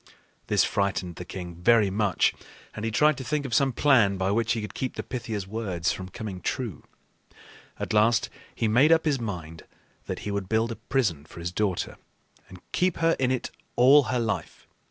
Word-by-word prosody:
This -, -, +3 dB
frightened 95 Hz, -3 st, -1 dB
the 90 Hz, -, -6 dB
king 90 Hz, -1 st, -7 dB
very 105 Hz, +3 st, +3 dB
much, 100 Hz, -3 st, +2 dB, 0.4 s
and 105 Hz, -, -7 dB
he 115 Hz, -, 0 dB
tried 150 Hz, +5 st, +3 dB
to -, -, -5 dB
think 150 Hz, +2 st, -1 dB
of 125 Hz, -, -5 dB
some 135 Hz, +4 st, +3 dB
plan 120 Hz, -8 st, +4 dB
by 95 Hz, +1 st, 0 dB
which 110 Hz, 0 st, +1 dB
he 115 Hz, -, -2 dB
could 105 Hz, -, -7 dB
keep 130 Hz, -, -3 dB
the -, -, -4 dB
Pythia's 110 Hz, -5 st, -4 dB
words 95 Hz, -5 st, -2 dB
from 95 Hz, -1 st, -6 dB
coming 100 Hz, -3 st, -7 dB
true. 115 Hz, -, -3 dB, 1.0 s
At -, -, -3 dB
last 110 Hz, +2 st, +3 dB, 0.3 s
he 115 Hz, -, 0 dB
made 130 Hz, +9 st, +5 dB
up 165 Hz, 0 st, +4 dB
his 145 Hz, -4 st, +1 dB
mind 85 Hz, -7 st, -6 dB, 0.5 s
that -, -, -4 dB
he 105 Hz, -, -2 dB
would 100 Hz, -2 st, -3 dB
build 110 Hz, +1 st, +1 dB
a -, -, -4 dB
prison 100 Hz, -, -1 dB
for 80 Hz, -, -13 dB
his 85 Hz, +1 st, -4 dB
daughter 95 Hz, -1 st, -1 dB, 0.5 s
and 90 Hz, -1 st, -12 dB
keep 180 Hz, -1 st, +1 dB
her 165 Hz, 0 st, +3 dB
in 130 Hz, -1 st, +2 dB
it 130 Hz, -1 st, -2 dB, 0.2 s
all 135 Hz, +3 st, +6 dB
her 125 Hz, -, -1 dB
life. 115 Hz, -2 st, -3 dB
110 Hz, 195 wpm, -26 LUFS, 95-130 Hz, 1.0 s, all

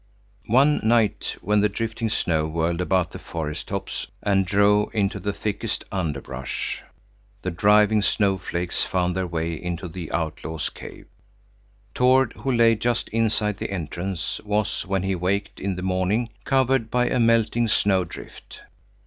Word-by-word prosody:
One 135 Hz, +6 st, +4 dB
night, 110 Hz, -1 st, +2 dB
when 105 Hz, +1 st, +2 dB
the 105 Hz, -, +3 dB
drifting 115 Hz, +2 st, -2 dB
snow 80 Hz, -6 st, 0 dB
whirled 85 Hz, +2 st, -1 dB
about 90 Hz, -1 st, +1 dB
the -, -, -8 dB
forest 75 Hz, -2 st, -5 dB
tops -, -, -4 dB, 0.2 s
and 95 Hz, -2 st, +2 dB
drove 100 Hz, +2 st, +3 dB
into 100 Hz, 0 st, +1 dB
the 100 Hz, +2 st, -2 dB
thickest 105 Hz, +2 st, -3 dB
underbrush, 80 Hz, -8 st, -3 dB, 0.6 s
the -, -, -1 dB
driving 105 Hz, +4 st, +4 dB
snowflakes 95 Hz, -4 st, 0 dB
found 90 Hz, -1 st, 0 dB
their 95 Hz, -1 st, -1 dB
way 85 Hz, 0 st, -2 dB
into 90 Hz, +2 st, -4 dB
the 85 Hz, -1 st, -7 dB
outlaws' 80 Hz, -1 st, -3 dB
cave. -, -, -11 dB, 0.9 s
Tord, 130 Hz, +1 st, +4 dB
who 135 Hz, -, -3 dB
lay 115 Hz, -2 st, +5 dB
just 120 Hz, +2 st, -1 dB
inside 110 Hz, -2 st, 0 dB
the -, -, -3 dB
entrance, 90 Hz, 0 st, -4 dB
was, 105 Hz, -1 st, -1 dB
when 95 Hz, -1 st, 0 dB
he 95 Hz, 0 st, 0 dB
waked 95 Hz, +3 st, -1 dB
in 95 Hz, -1 st, -2 dB
the 90 Hz, -, -5 dB
morning, 95 Hz, +5 st, 0 dB, 0.2 s
covered 130 Hz, -3 st, +2 dB
by 125 Hz, +1 st, +2 dB
a 125 Hz, -, +1 dB
melting 115 Hz, 0 st, +3 dB
snowdrift. 95 Hz, -5 st, -1 dB
100 Hz, 145 wpm, -24 LUFS, 90-110 Hz, 0.9 s, lay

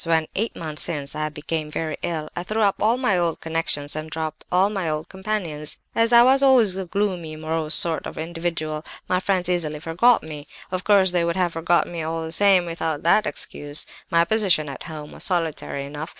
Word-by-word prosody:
When, 160 Hz, -1 st, +1 dB
eight 225 Hz, +4 st, -2 dB
months 155 Hz, -2 st, 0 dB
since, 145 Hz, -5 st, +2 dB
I 155 Hz, 0 st, -2 dB
became 155 Hz, +1 st, -4 dB
very 155 Hz, 0 st, -3 dB
ill, 160 Hz, -3 st, -3 dB
I 175 Hz, -, -2 dB
threw 215 Hz, +5 st, -2 dB
up 200 Hz, -1 st, +2 dB
all 225 Hz, +3 st, +3 dB
my 210 Hz, -8 st, +1 dB
old 170 Hz, -2 st, -1 dB
connections 160 Hz, -3 st, 0 dB
and 155 Hz, 0 st, -5 dB
dropped 155 Hz, -1 st, -5 dB
all 190 Hz, +3 st, +3 dB
my 190 Hz, -6 st, -2 dB
old 155 Hz, +1 st, -3 dB
companions. 190 Hz, -7 st, -2 dB, 0.2 s
As 230 Hz, +1 st, +2 dB
I 235 Hz, 0 st, +8 dB
was 265 Hz, +2 st, +5 dB
always 250 Hz, -8 st, +5 dB
a 190 Hz, -1 st, -4 dB
gloomy, 180 Hz, -4 st, -2 dB
morose 155 Hz, 0 st, -1 dB
sort 165 Hz, -2 st, +1 dB
of -, -, -9 dB
individual, 165 Hz, -2 st, -3 dB, 0.2 s
my 185 Hz, -, +1 dB
friends 185 Hz, -2 st, 0 dB
easily 160 Hz, -4 st, -1 dB
forgot 175 Hz, +10 st, +3 dB
me; 150 Hz, -2 st, -8 dB, 0.2 s
of 185 Hz, -1 st, -2 dB
course, 195 Hz, -3 st, +4 dB
they 175 Hz, -1 st, +1 dB
would 170 Hz, 0 st, -1 dB
have 180 Hz, -2 st, 0 dB
forgotten 170 Hz, +2 st, +1 dB
me 170 Hz, -1 st, -4 dB
all 165 Hz, +1 st, -3 dB
the 160 Hz, -, -6 dB
same, 190 Hz, 0 st, +4 dB
without 165 Hz, -3 st, -3 dB
that 190 Hz, +6 st, +3 dB
excuse. 145 Hz, 0 st, -2 dB, 0.2 s
My 170 Hz, -2 st, +3 dB
position 185 Hz, -7 st, +2 dB
at 135 Hz, -, -8 dB
home 150 Hz, -2 st, -8 dB
was -, -, -5 dB
solitary 160 Hz, -5 st, -1 dB
enough. 150 Hz, +3 st, -7 dB
165 Hz, 205 wpm, -23 LUFS, 155-190 Hz, 0.2 s, I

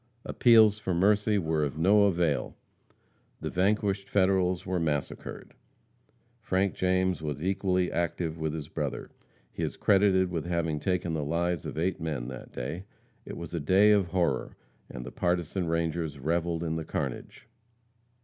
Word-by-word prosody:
Appeals 110 Hz, -3 st, +5 dB
for 95 Hz, -4 st, -2 dB
mercy 105 Hz, +3 st, +3 dB
were 80 Hz, -4 st, 0 dB
of 75 Hz, +1 st, -3 dB
no 100 Hz, +5 st, +5 dB
avail. 85 Hz, -6 st, 0 dB, 0.8 s
The -, -, -4 dB
vanquished 100 Hz, +1 st, 0 dB
Federals 95 Hz, -2 st, +2 dB
were 95 Hz, -1 st, -1 dB
massacred. 75 Hz, -4 st, -4 dB, 0.9 s
Frank 95 Hz, +1 st, 0 dB
James 95 Hz, -1 st, +1 dB
was 75 Hz, 0 st, -4 dB
equally 95 Hz, -1 st, 0 dB
active 85 Hz, -1 st, -2 dB
with 80 Hz, -1 st, -1 dB
his 75 Hz, -3 st, -6 dB
brother. 75 Hz, -3 st, -4 dB, 0.4 s
He -, -, -7 dB
is -, -, -3 dB
credited 95 Hz, -2 st, +3 dB
with 85 Hz, -3 st, -3 dB
having 85 Hz, -3 st, -1 dB
taken 90 Hz, 0 st, -1 dB
the 80 Hz, -2 st, -1 dB
lives 85 Hz, +2 st, -1 dB
of -, -, -7 dB
eight 90 Hz, +2 st, -1 dB
men 75 Hz, -7 st, -3 dB
that 65 Hz, -, -9 dB
day. 75 Hz, +10 st, -5 dB, 0.4 s
It -, -, -7 dB
was 85 Hz, 0 st, -8 dB
a 85 Hz, -, -1 dB
day 95 Hz, +8 st, +5 dB
of 100 Hz, -4 st, +3 dB
horror, 85 Hz, -7 st, -1 dB, 0.3 s
and 60 Hz, -1 st, -7 dB
the 60 Hz, -, -7 dB
partisan 90 Hz, 0 st, -1 dB
rangers 80 Hz, -2 st, -1 dB
revelled 85 Hz, +4 st, -1 dB
in 80 Hz, -1 st, -2 dB
the 80 Hz, -, -3 dB
carnage. -, -, -5 dB
85 Hz, 155 wpm, -28 LUFS, 80-95 Hz, 0.9 s, Appeals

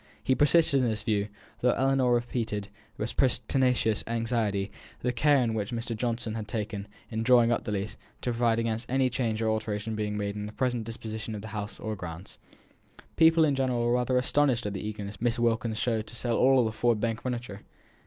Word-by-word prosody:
He 130 Hz, -, +3 dB
persisted 145 Hz, 0 st, +4 dB
in 125 Hz, -, +2 dB
this 110 Hz, -1 st, -3 dB
view, 105 Hz, -2 st, 0 dB, 0.3 s
though 125 Hz, 0 st, +3 dB
Ellinor 135 Hz, -1 st, +2 dB
repeated, 115 Hz, -4 st, -2 dB, 0.3 s
with 105 Hz, +3 st, -3 dB
pertinacious 125 Hz, -3 st, +2 dB
anxiety, 115 Hz, -4 st, -1 dB, 0.3 s
the 125 Hz, -, +1 dB
care 140 Hz, +1 st, +4 dB
which 105 Hz, -2 st, -2 dB
Mr. 115 Hz, 0 st, -3 dB
Johnson 115 Hz, -1 st, -2 dB
had 110 Hz, -1 st, -5 dB
taken, 105 Hz, -2 st, -4 dB, 0.2 s
in 110 Hz, 0 st, -2 dB
drawing 120 Hz, 0 st, +5 dB
up 120 Hz, -, 0 dB
the -, -, -2 dB
lease, 100 Hz, +1 st, -3 dB, 0.2 s
to 125 Hz, -, -1 dB
provide 115 Hz, -1 st, +2 dB
against 115 Hz, 0 st, -2 dB
any 130 Hz, 0 st, +2 dB
change 115 Hz, -3 st, -1 dB
or 110 Hz, -, +2 dB
alteration 110 Hz, 0 st, -2 dB
being 105 Hz, -1 st, -2 dB
made 100 Hz, 0 st, -2 dB
in 105 Hz, 0 st, -4 dB
the 105 Hz, -, -9 dB
present 125 Hz, -3 st, -1 dB
disposition 110 Hz, -1 st, -5 dB
of 105 Hz, -, -7 dB
the 110 Hz, -, -7 dB
house 105 Hz, 0 st, -5 dB
or 110 Hz, 0 st, -3 dB
grounds. 90 Hz, -1 st, -8 dB, 0.8 s
People 160 Hz, 0 st, +6 dB
in 145 Hz, -, +2 dB
general 130 Hz, -3 st, 0 dB
were 120 Hz, -, +2 dB
rather 125 Hz, +1 st, +2 dB
astonished 130 Hz, -2 st, +2 dB
at 105 Hz, -, -2 dB
the 95 Hz, -, -4 dB
eagerness 105 Hz, -1 st, -6 dB
Miss 120 Hz, 0 st, +1 dB
Wilkins 115 Hz, -1 st, 0 dB
showed 110 Hz, -2 st, 0 dB
to -, -, -8 dB
sell 120 Hz, 0 st, 0 dB
all 130 Hz, -1 st, +5 dB
the 110 Hz, -, -1 dB
Ford 115 Hz, 0 st, +1 dB
Bank 115 Hz, 0 st, -1 dB
furniture. 120 Hz, -5 st, -4 dB
115 Hz, 200 wpm, -28 LUFS, 105-125 Hz, 0.8 s, People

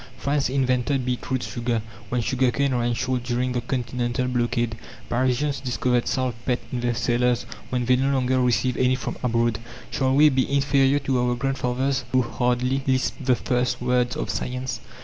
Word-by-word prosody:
France 140 Hz, -1 st, 0 dB
invented 130 Hz, 0 st, +1 dB
beet 125 Hz, -1 st, -3 dB
root 130 Hz, -1 st, 0 dB
sugar 120 Hz, -2 st, -2 dB, 0.3 s
when 125 Hz, -1 st, 0 dB
sugar 125 Hz, +3 st, +1 dB
cane 140 Hz, +1 st, 0 dB
ran 120 Hz, -1 st, 0 dB
short 125 Hz, +1 st, -1 dB
during 125 Hz, +1 st, -1 dB
the 125 Hz, -1 st, -1 dB
continental 125 Hz, 0 st, -2 dB
blockade. 120 Hz, -2 st, 0 dB, 0.3 s
Parisians 130 Hz, +3 st, +1 dB
discovered 125 Hz, -1 st, 0 dB
saltpetre 125 Hz, -1 st, -1 dB
in 125 Hz, -, -2 dB
their 120 Hz, 0 st, 0 dB
cellars 120 Hz, 0 st, +1 dB, 0.2 s
when 125 Hz, -1 st, -1 dB
they 125 Hz, +1 st, +4 dB
no 135 Hz, +2 st, +1 dB
longer 130 Hz, -1 st, +2 dB
received 125 Hz, 0 st, +1 dB
any 130 Hz, 0 st, +3 dB
from 130 Hz, -, -4 dB
abroad. 115 Hz, -3 st, +1 dB, 0.3 s
Shall 130 Hz, -1 st, +1 dB
we 150 Hz, +2 st, +7 dB
be 130 Hz, -1 st, 0 dB
inferior 140 Hz, 0 st, +3 dB
to 135 Hz, -2 st, 0 dB
our 125 Hz, 0 st, +1 dB
grandfathers, 130 Hz, +1 st, -1 dB
who 130 Hz, -1 st, +4 dB
hardly 125 Hz, +2 st, 0 dB
lisped 130 Hz, +2 st, 0 dB
the 125 Hz, -1 st, +3 dB
first 125 Hz, 0 st, 0 dB
words 125 Hz, 0 st, +1 dB
of -, -, -2 dB
science? 125 Hz, +1 st, -3 dB
125 Hz, 170 wpm, -24 LUFS, 120-130 Hz, 0.3 s, we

